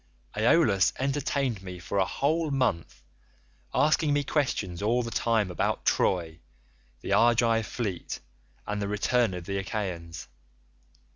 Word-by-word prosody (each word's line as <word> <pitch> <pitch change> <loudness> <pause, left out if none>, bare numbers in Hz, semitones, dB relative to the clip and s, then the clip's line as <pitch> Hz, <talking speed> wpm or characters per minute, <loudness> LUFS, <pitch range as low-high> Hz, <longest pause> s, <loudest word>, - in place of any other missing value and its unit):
"Aeolus 105 - +3
entertained 135 -4 -1
me 90 -1 -8
for 95 +3 -3
a 95 - +3
whole 155 - 0
month 125 - -1 0.7
asking 150 0 +2
me 145 0 +1
questions 105 - -1
all 120 +4 +1
the 115 - -5
time 110 -6 +1
about 90 - -1
Troy, 85 -3 +1 0.6
the - - -2
Argive 115 -1 +3
fleet, 105 -8 -4 0.5
and 105 0 -3
the 100 - -1
return 105 0 +1
of 90 -2 -7
the 100 +1 -2
Achaeans. 85 -6 -5
110 Hz, 130 wpm, -27 LUFS, 95-125 Hz, 0.7 s, Aeolus